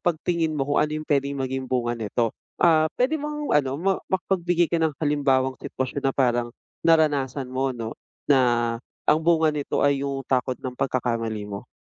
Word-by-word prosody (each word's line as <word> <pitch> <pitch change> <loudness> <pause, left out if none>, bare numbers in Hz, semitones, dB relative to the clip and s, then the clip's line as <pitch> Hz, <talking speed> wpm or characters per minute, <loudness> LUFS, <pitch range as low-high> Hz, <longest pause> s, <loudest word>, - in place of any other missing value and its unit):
pagtingin 170 -1 0
mo 140 -3 -1
kung 145 - +2
ano 150 - -4
yung 155 0 -5
puwedeng 140 -1 0
maging 130 0 -2
bunga 120 -2 -1
nito. 115 +1 -1 0.2
Ah, 160 -2 +5
puwede 265 +6 +1
bang 300 0 -4 0.2
ano 135 -3 +2
ma 195 +1 +2
makapagbigay 175 -2 +1
ka 170 - 0
ng 160 -2 +1
halimbawang 135 -3 +1
sitwasyon 130 +3 -4
na 135 - +2
parang 120 -3 +1 0.3
naranasan 145 -5 +2
mo 130 +1 -1
'no, 115 -2 -6 0.3
na 120 -4 +3 0.3
ang 155 - +6
bunga 160 -2 +4
nito 145 - -1
ay 140 -1 +2
yung 140 -1 -2
takot 130 -1 +1
ng 130 -2 -6
pagkakamali 115 -5 -1
mo? 100 +4 -7
135 Hz, 175 wpm, -24 LUFS, 125-155 Hz, 0.3 s, ang